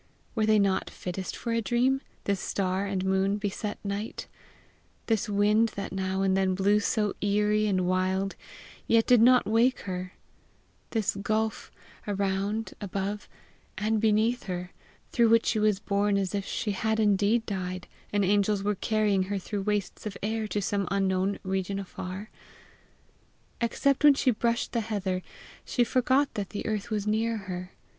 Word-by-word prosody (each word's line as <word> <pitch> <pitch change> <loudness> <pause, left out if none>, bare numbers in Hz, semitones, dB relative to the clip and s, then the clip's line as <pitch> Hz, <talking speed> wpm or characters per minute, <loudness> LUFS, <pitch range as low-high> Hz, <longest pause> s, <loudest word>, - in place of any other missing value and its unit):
Were 215 -2 +1
they 215 0 +5
not 200 -2 +1
fittest 185 +1 -5
for 235 - -4
a 230 - +1
dream, 245 +5 +1 0.2
this 200 -1 0
star 190 +1 -1
and 190 -1 -2
moon 190 +1 +2
beset 205 0 -3
night 200 +2 -4 0.8
this 225 -1 0
wind 210 +2 +3
that 200 -1 -4
now 190 0 -1
and 190 -1 +2
then 190 -1 +2
blew 200 +2 +3
so 210 -1 0
eerie 210 +1 +2
and 190 -3 +1
wild, 185 +2 0 0.5
yet 225 -1 +4
did 245 -3 +5
not 250 +1 +6
wake 230 +4 +2
her 185 -1 -5 0.8
this 220 -5 0
gulf 215 +2 -1 0.4
around, 200 +1 -1
above, 200 +1 -3 0.5
and 215 +2 0
beneath 220 +2 +2
her, 180 -1 -4 0.4
through 235 -2 +4
which 230 0 +5
she 220 - +1
was 210 -2 +2
borne 200 0 +1
as 195 -1 -1
if 200 -1 -2
she 210 - -2
had 220 +2 0
indeed 210 +2 +3
died, 185 -2 -4 0.2
and 205 -1 +2
angels 205 +1 +2
were 210 +1 +1
carrying 210 -1 +1
her 205 - 0
through 200 +2 -4
wastes 210 +1 -2
of 205 - -6
air 220 +1 -1
to 205 -1 -2
some 200 -1 -1
unknown 195 0 +1
region 190 0 -2
afar? 190 +1 -6 1.3
Except 275 +4 +1
when 290 -2 +8
she 265 -2 +3
brushed 235 +1 0
the 235 - 0
heather, 195 -4 -2 0.4
she 245 - +1
forgot 260 +3 +2
that 200 -2 -3
the 205 - -5
earth 215 +1 -2
was 210 -2 -1
near 225 +2 +1
her. 185 -2 -6
205 Hz, 160 wpm, -28 LUFS, 195-220 Hz, 1.3 s, when